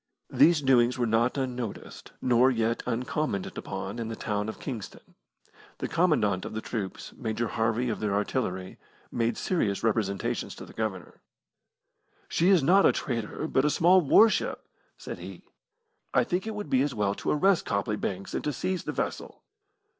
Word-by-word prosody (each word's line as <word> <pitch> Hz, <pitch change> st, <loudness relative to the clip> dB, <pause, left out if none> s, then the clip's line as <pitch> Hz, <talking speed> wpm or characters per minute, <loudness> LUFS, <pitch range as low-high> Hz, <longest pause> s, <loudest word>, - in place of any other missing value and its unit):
These 165 Hz, -3 st, +5 dB
doings 125 Hz, -2 st, +4 dB
were 120 Hz, -, +1 dB
not 115 Hz, +4 st, +1 dB
unnoticed, 125 Hz, -5 st, -5 dB
nor 125 Hz, +1 st, +5 dB
yet 115 Hz, -2 st, 0 dB
uncommented 125 Hz, -3 st, -2 dB
upon 100 Hz, +5 st, -5 dB
in 115 Hz, -, -3 dB
the 115 Hz, -, -4 dB
town 105 Hz, 0 st, -2 dB
of -, -, -7 dB
Kingston. 120 Hz, -8 st, -7 dB, 0.6 s
The -, -, -3 dB
Commandant 110 Hz, -, +2 dB
of -, -, -6 dB
the -, -, -1 dB
troops 105 Hz, -4 st, -5 dB
Major 115 Hz, -1 st, -3 dB
Harvey 115 Hz, +2 st, 0 dB
of 110 Hz, -, -2 dB
the 105 Hz, -1 st, -1 dB
Artillery 100 Hz, -3 st, -2 dB, 0.3 s
made 115 Hz, -1 st, 0 dB
serious 110 Hz, -, -1 dB
representations 105 Hz, -3 st, -1 dB
to -, -, -9 dB
the -, -, -14 dB
Governor. 105 Hz, -5 st, -5 dB, 1.1 s
"She 175 Hz, +3 st, +2 dB
is 185 Hz, -7 st, +5 dB
not 190 Hz, +7 st, +5 dB
a -, -, +6 dB
trader, 120 Hz, +4 st, -3 dB
but 130 Hz, -, +2 dB
a 150 Hz, -, +3 dB
small 180 Hz, +5 st, +5 dB
warship," 215 Hz, +9 st, +3 dB, 0.3 s
said -, -, -7 dB
he. -, -, -9 dB, 0.7 s
"I -, -, +5 dB
think 185 Hz, +2 st, -2 dB
it 220 Hz, -, -4 dB
would 210 Hz, 0 st, -6 dB
be 130 Hz, -, +4 dB
as 140 Hz, -1 st, -1 dB
well 100 Hz, -2 st, +1 dB
to -, -, -4 dB
arrest 185 Hz, +4 st, +3 dB
Copley 100 Hz, 0 st, 0 dB
Banks 100 Hz, -2 st, -4 dB
and -, -, -2 dB
to 150 Hz, -, 0 dB
seize 185 Hz, +7 st, -2 dB
the -, -, -2 dB
vessel." -, -, -4 dB
120 Hz, 170 wpm, -28 LUFS, 105-150 Hz, 1.1 s, a